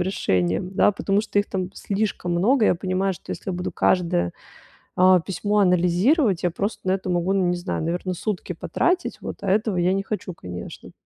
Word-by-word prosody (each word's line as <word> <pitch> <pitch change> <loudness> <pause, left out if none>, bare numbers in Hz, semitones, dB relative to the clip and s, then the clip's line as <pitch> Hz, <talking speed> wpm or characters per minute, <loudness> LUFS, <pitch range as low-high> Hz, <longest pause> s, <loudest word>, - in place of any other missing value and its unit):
решением, 175 - 0
да, 205 - +4
потому 195 +1 0
что 210 -1 -1
их 205 - +1
там 185 -2 -2
слишком 200 -3 -2
много. 220 +8 +3
Я - - +4
понимаю, 185 +2 -1
что 170 - -11
если - - -4
я - - -2
буду 180 - -3
каждое, 165 - +1 0.6
а, 185 0 +6
письмо 205 +4 -1
анализировать, 180 - +3
я 175 - +2
просто 200 +2 -4
на - - +3
это 190 -1 -2
могу, 175 +1 +1
ну 195 -2 +2
не 175 - +1
знаю, 175 -1 -3
наверное, 175 +3 -2
сутки 185 -1 -3
потратить, 355 - -1
вот. - - -6
А 195 - -2
этого 210 -1 +1
я 180 +2 +2
не 195 - -1
хочу, 200 -2 -4
конечно. 90 - -9
185 Hz, 195 wpm, -23 LUFS, 175-200 Hz, 0.6 s, а